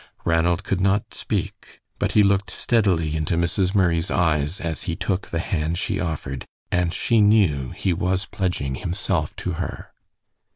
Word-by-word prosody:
Ranald 85 +3 +2
could 95 -1 -1
not 100 +2 +1
speak, - - -4 0.2
but - - 0
he 105 - +6
looked 100 +1 +2
steadily 90 -10 +1
into 80 +2 0
Mrs. 90 +3 +1
Murray's 85 -3 +2
eyes 80 0 +1
as 85 -2 -3
he 85 - -1
took 95 +2 -2
the 85 - -3
hand 80 -1 -1
she 95 +1 -1
offered, 70 -6 -4 0.2
and 90 -1 +1
she 115 +4 +2
knew 95 - +3
he 95 - -1
was 90 +2 0
pledging 90 -8 -2
himself 85 +1 -1
to 95 - -3
her. 90 - -6
90 Hz, 160 wpm, -23 LUFS, 80-95 Hz, 0.2 s, he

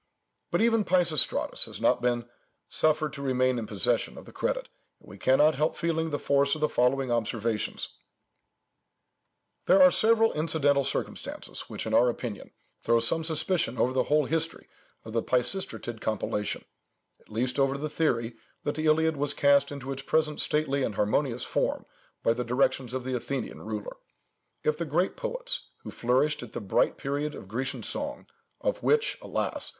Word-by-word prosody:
But - - +1
even 225 -2 +3
Peisistratus 175 -6 +3
has - - -8
not - - +2
been 120 -1 0 0.4
suffered 155 -1 +1
to 140 - -7
remain 130 -2 +1
in 110 - -5
possession 115 +3 0
of - - -10
the - - -13
credit, - - -2 0.3
and - - -21
we - - -12
cannot 150 +4 +4
help 150 +3 0
feeling 165 -1 -1
the 145 - -1
force 140 0 +2
of 155 - -8
the 150 - +3
following 130 0 +1
observations— 115 -1 -1 1.8
"There 190 +2 +6
are 185 -1 +8
several 225 +2 +3
incidental 150 -3 +2
circumstances - - -4
which, - - -5
in - - -3
our 125 - +5
opinion, 115 -3 -5 0.3
throw 115 0 +3
some 140 +8 +1
suspicion 160 -4 0
over 130 - +1
the 130 -1 +1
whole 150 0 +2
history 165 +2 -2 0.4
of 110 - -8
the 115 - +1
Peisistratid 120 - +1
compilation, 105 -1 -2 0.5
at - - -27
least 125 +5 -1
over 135 0 +2
the 150 +2 -3
theory, 125 -7 -1 0.3
that 145 - -1
the 155 0 -2
Iliad 160 0 +3
was 145 0 0
cast 140 0 +4
into 135 -1 -6
its 135 0 -4
present 150 +1 0
stately 145 -2 +1
and 110 -5 -1
harmonious 120 +5 0
form - - -1 0.4
by 115 - +3
the 125 +1 -3
directions 125 +1 0
of 130 - -3
the 130 0 -2
Athenian 125 0 -4
ruler. 105 -1 -6 0.7
If 155 +1 0
the 170 - -1
great 170 +5 0
poets, - - -3
who - - -7
flourished 130 +5 +1
at 120 - -10
the - - -3
bright 100 -4 +1
period 145 +2 -3
of - - -10
Grecian 130 +7 -3
song, - - -3 0.3
of - - -2
which, 455 +2 +2
alas! - - -2
140 Hz, 170 wpm, -28 LUFS, 120-155 Hz, 1.8 s, are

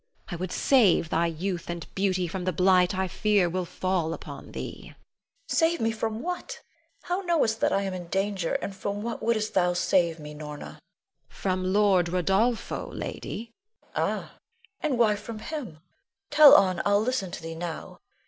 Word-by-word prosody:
I - - -4
would 180 +1 -4
save 210 -11 +3
thy 170 +1 +2
youth 175 +2 -4
and 170 -1 -4
beauty 185 -2 0
from 180 +2 -4
the 185 - +1
blight 185 +1 +3
I 190 0 0
fear 205 0 +2
will 180 +1 -2
fall 175 -2 -1
upon - - -10
thee. - - -6
Leonore. - - -14 0.5
Save 335 -4 +2
me! 225 0 +1
from 220 +1 -3
what? 360 +1 -4 0.4
How 360 +2 -1
knowest 320 - +1
thou - - +4
I 200 - +1
am 195 -1 -3
in 180 -2 -6
danger; 195 -1 -1
and 195 - -4
from 200 +1 -4
what 235 0 -4
wouldst 220 -2 0
thou 180 -2 +3
save 170 -2 +2
me, 150 0 -8
Norna? 150 -1 -8
Norna. - - -11 0.5
From 185 -1 -2
Lord 195 -3 +4
Rodolpho, 195 +7 0
lady. 230 +1 -6 0.4
Leonore. - - +1
Ah! - - -13 0.5
and 290 -5 0
why 220 -3 +4
from 225 +2 -7
him? 215 - -6 0.5
Tell 300 -2 +9
on, 185 -3 +4
I'll 205 0 +3
listen 235 -6 -1
to - - -7
thee 165 0 -5
now. 165 0 -6
190 Hz, 175 wpm, -27 LUFS, 175-220 Hz, 0.5 s, Tell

